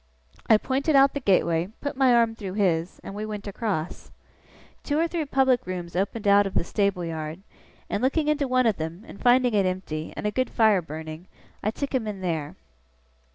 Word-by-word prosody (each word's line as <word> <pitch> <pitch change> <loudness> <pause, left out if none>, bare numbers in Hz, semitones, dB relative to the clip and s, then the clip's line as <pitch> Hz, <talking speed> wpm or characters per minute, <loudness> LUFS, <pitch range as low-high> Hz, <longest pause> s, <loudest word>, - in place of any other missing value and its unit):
I 220 - +8
pointed 275 +6 0
out 275 0 +6
the 285 - -2
gateway, 175 -7 +2
put 285 - -4
my 265 -1 +4
arm 230 -1 +4
through 200 -4 -6
his, 180 -4 0
and - - -7
we 210 +1 -5
went 210 -1 -5
across. 200 -5 -4 0.7
Two 290 - -1
or 330 +2 +2
three 330 -2 -2
public 265 -5 +2
rooms 175 -2 -5
opened 200 +3 -1
out 200 0 +5
of 195 - -8
the - - +2
stable 200 -2 0
yard; 160 +1 -5 0.5
and 205 - -2
looking 295 +4 +1
into 300 -2 +1
one 255 0 +2
of 220 -4 +2
them, 160 +5 -5
and - - -12
finding 245 -1 +4
it 200 -3 +3
empty, 170 -4 -4
and - - -4
a 210 - +1
good 255 +3 -1
fire 215 -5 +3
burning, 160 +2 -8 0.3
I 215 - 0
took 280 +6 -4
him 245 -5 0
in 200 -3 -5
there. 160 -5 -3
205 Hz, 200 wpm, -25 LUFS, 180-255 Hz, 0.7 s, I